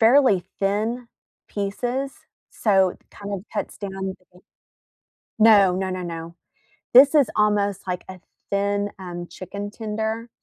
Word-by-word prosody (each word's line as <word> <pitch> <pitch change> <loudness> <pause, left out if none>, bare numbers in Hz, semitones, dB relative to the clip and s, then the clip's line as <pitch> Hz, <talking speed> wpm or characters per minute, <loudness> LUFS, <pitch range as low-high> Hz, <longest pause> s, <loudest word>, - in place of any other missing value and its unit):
fairly 230 -5 +5 0.2
thin 220 +5 -1 0.4
pieces, 245 +7 -2 0.4
so, 195 -4 +3
it - - -13
kind 205 0 -8
of 195 - -2
cuts - - -4
down 200 -2 -5 0.4
the 180 - -19 1.0
No. 205 -4 +6
No, 190 0 -2
no, 185 0 -3
no. 165 -1 -6 0.6
This 275 +4 +8
is 285 -5 +5
almost 205 -2 +1
like 180 0 -3
a 185 -1 -9 0.3
thin, 200 +1 0
um, 175 -1 -6
chicken 200 +4 -7
tender 220 +1 -3
205 Hz, 130 wpm, -23 LUFS, 185-220 Hz, 1.0 s, This